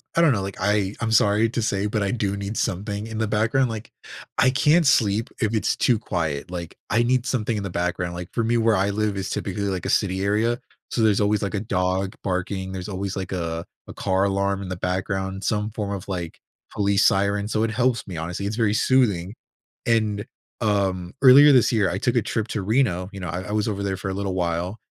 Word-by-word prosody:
I -, -, +3 dB
don't 160 Hz, -5 st, +5 dB
know. 100 Hz, -, -1 dB
Like, 95 Hz, +1 st, -5 dB
I 100 Hz, 0 st, +1 dB
I'm 115 Hz, -1 st, -1 dB
sorry 105 Hz, 0 st, +4 dB
to 120 Hz, +1 st, -2 dB
say, 100 Hz, -2 st, 0 dB
but 105 Hz, 0 st, 0 dB
I 100 Hz, -, 0 dB
do 100 Hz, -4 st, -1 dB
need 100 Hz, +2 st, -4 dB
something 100 Hz, +3 st, -2 dB
in 110 Hz, -1 st, -6 dB
the 110 Hz, 0 st, 0 dB
background. 115 Hz, +5 st, +1 dB
Like, 110 Hz, -1 st, -6 dB, 0.5 s
I 130 Hz, -, +5 dB
can't 150 Hz, +6 st, +3 dB
sleep 110 Hz, -3 st, +3 dB
if 110 Hz, -3 st, 0 dB
it's 110 Hz, -, +1 dB
too 120 Hz, -, +3 dB
quiet. 80 Hz, -7 st, -3 dB
Like, 85 Hz, -2 st, -6 dB
I 115 Hz, +2 st, +3 dB
need 125 Hz, 0 st, +1 dB
something 120 Hz, -4 st, -1 dB
in 105 Hz, -, -3 dB
the 100 Hz, -, -4 dB
background. 90 Hz, 0 st, -2 dB
Like, 85 Hz, 0 st, -6 dB
for 115 Hz, -, 0 dB
me, 120 Hz, +1 st, +2 dB
where 115 Hz, -1 st, +3 dB
I 100 Hz, +1 st, +1 dB
live 105 Hz, 0 st, -1 dB
is 95 Hz, -, -3 dB
typically, 100 Hz, +1 st, -3 dB
like, 95 Hz, -2 st, -2 dB
a -, -, -1 dB
city 95 Hz, -2 st, +1 dB
area. 110 Hz, +4 st, +1 dB, 0.3 s
So, 120 Hz, -, -1 dB
there's 110 Hz, -2 st, +3 dB
always, 105 Hz, +1 st, +2 dB
like, 100 Hz, -3 st, -2 dB
a 100 Hz, -, -1 dB
dog 95 Hz, -1 st, -1 dB
barking. 95 Hz, 0 st, -2 dB
There's 95 Hz, +2 st, -5 dB
always, 100 Hz, 0 st, -3 dB
like, 95 Hz, -1 st, -5 dB
a 85 Hz, -2 st, -3 dB, 0.2 s
a -, -, -8 dB
car 95 Hz, +1 st, +1 dB
alarm 100 Hz, 0 st, 0 dB
in 95 Hz, -, -6 dB
the 95 Hz, -, -3 dB
background, 95 Hz, +2 st, -2 dB
some 105 Hz, 0 st, -1 dB
form 105 Hz, -1 st, -4 dB
of, 100 Hz, -2 st, -5 dB
like, 90 Hz, -3 st, -4 dB, 0.3 s
police 100 Hz, -1 st, +2 dB
siren. 100 Hz, +1 st, +2 dB
So, 110 Hz, 0 st, 0 dB
it 115 Hz, -, 0 dB
helps 120 Hz, 0 st, +1 dB
me, 90 Hz, -4 st, -6 dB
honestly. 85 Hz, +4 st, -4 dB
It's 105 Hz, +2 st, -3 dB
very 110 Hz, -3 st, +2 dB
soothing. 105 Hz, -7 st, +2 dB, 0.5 s
And, 110 Hz, -2 st, +1 dB, 0.4 s
um, 95 Hz, -4 st, 0 dB
earlier 140 Hz, +2 st, +9 dB
this 125 Hz, -3 st, +5 dB
year, 105 Hz, -5 st, +2 dB
I 85 Hz, -, -2 dB
took 120 Hz, +5 st, 0 dB
a -, -, +4 dB
trip 110 Hz, +1 st, -2 dB
to 105 Hz, -, -2 dB
Reno. 95 Hz, -5 st, +1 dB
You 100 Hz, -, -7 dB
know, 90 Hz, -, -4 dB
I 90 Hz, +4 st, -4 dB
I 105 Hz, -, -7 dB
was 105 Hz, 0 st, 0 dB
over 100 Hz, -1 st, -3 dB
there 95 Hz, -1 st, -2 dB
for 95 Hz, +1 st, -4 dB
a -, -, -2 dB
little 95 Hz, -1 st, -3 dB
while, 90 Hz, +2 st, -1 dB
100 Hz, 235 wpm, -23 LUFS, 95-110 Hz, 0.5 s, earlier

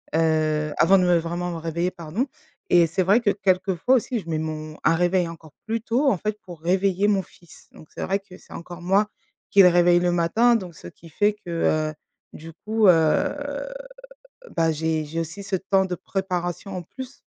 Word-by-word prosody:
heu, 155 Hz, -2 st, +1 dB
avant 195 Hz, +3 st, +5 dB
de 185 Hz, -, +2 dB
me 175 Hz, -1 st, +4 dB
vraiment 175 Hz, +2 st, -3 dB
me 170 Hz, -, -5 dB
réveiller», 170 Hz, +2 st, -2 dB
pardon 175 Hz, -, -3 dB, 0.4 s
et 170 Hz, -1 st, +6 dB
c'est 180 Hz, +4 st, -1 dB
vrai 200 Hz, +6 st, +4 dB
que 210 Hz, -, +2 dB
quelquefois 190 Hz, +4 st, +1 dB
aussi, 245 Hz, -1 st, -1 dB
je 170 Hz, -, -12 dB
mets 155 Hz, -1 st, -1 dB
mon 155 Hz, 0 st, -5 dB
un 165 Hz, -, +4 dB
réveil 175 Hz, +1 st, +2 dB
encore 160 Hz, -2 st, -12 dB
plus 225 Hz, +1 st, -1 dB
tôt 250 Hz, +5 st, +1 dB
en 195 Hz, -, 0 dB
fait, 210 Hz, +3 st, -3 dB
pour 175 Hz, -4 st, -11 dB
réveiller 190 Hz, +3 st, +1 dB
mon 200 Hz, -2 st, +2 dB
fils. 175 Hz, -2 st, -19 dB
Donc 155 Hz, -, -15 dB
c'est -, -, -4 dB
vrai 195 Hz, +2 st, 0 dB
que 195 Hz, -2 st, -15 dB
c'est -, -, -21 dB
encore 175 Hz, +1 st, -9 dB
moi 195 Hz, +4 st, +2 dB, 0.4 s
qui 200 Hz, -, +7 dB
le 180 Hz, -, +8 dB
réveille 175 Hz, 0 st, +4 dB
le 175 Hz, 0 st, +1 dB
matin 225 Hz, +8 st, +3 dB
donc 180 Hz, -5 st, -8 dB
ce 85 Hz, -, -11 dB
qui 165 Hz, -, -15 dB
fait 205 Hz, +6 st, +1 dB
que, -, -, -8 dB
heu, 155 Hz, -2 st, 0 dB, 0.4 s
du 165 Hz, +1 st, -10 dB
coup, 220 Hz, -1 st, +3 dB
heu, 165 Hz, -, +3 dB, 1.2 s
bah, 165 Hz, -1 st, +2 dB
j'ai 160 Hz, 0 st, -1 dB
j'ai 165 Hz, +3 st, -4 dB
aussi 170 Hz, +5 st, -6 dB
ce 195 Hz, -, -4 dB
temps 190 Hz, +1 st, +1 dB
de 180 Hz, -1 st, -3 dB
préparation 185 Hz, 0 st, -4 dB
en 180 Hz, -, -4 dB
plus. 260 Hz, -, -10 dB
175 Hz, 205 wpm, -23 LUFS, 165-195 Hz, 1.2 s, le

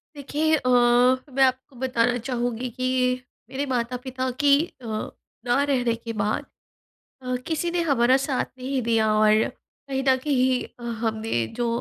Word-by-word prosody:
देखिए 300 Hz, +2 st, 0 dB
अ, 255 Hz, -, -1 dB
मैं 250 Hz, +2 st, +3 dB
आपको 260 Hz, +1 st, 0 dB
बताना 245 Hz, -1 st, +1 dB
चाहूँगी 245 Hz, 0 st, -3 dB
कि 255 Hz, +1 st, 0 dB, 0.3 s
मेरे 275 Hz, +2 st, -3 dB
माता-पिता 255 Hz, 0 st, -2 dB
की 280 Hz, -1 st, +7 dB, 0.3 s
अ, -, -, -11 dB, 0.6 s
ना 245 Hz, +3 st, +2 dB
रहने 250 Hz, -5 st, +1 dB
के 230 Hz, 0 st, -7 dB
बाद 210 Hz, 0 st, -1 dB, 0.8 s
अ, 255 Hz, 0 st, -2 dB
किसी 335 Hz, +1 st, -1 dB
ने 345 Hz, 0 st, 0 dB
हमारा 260 Hz, -5 st, +3 dB
साथ 265 Hz, -3 st, 0 dB
नहीं 260 Hz, +1 st, -2 dB
दिया। 225 Hz, -2 st, +2 dB
और 215 Hz, 0 st, +4 dB, 0.4 s
कहीं 270 Hz, -1 st, -1 dB
न 260 Hz, -, +5 dB
कहीं 255 Hz, -3 st, -1 dB
हमने 220 Hz, -, -1 dB
जो 240 Hz, -, 0 dB
255 Hz, 140 wpm, -24 LUFS, 235-265 Hz, 0.8 s, की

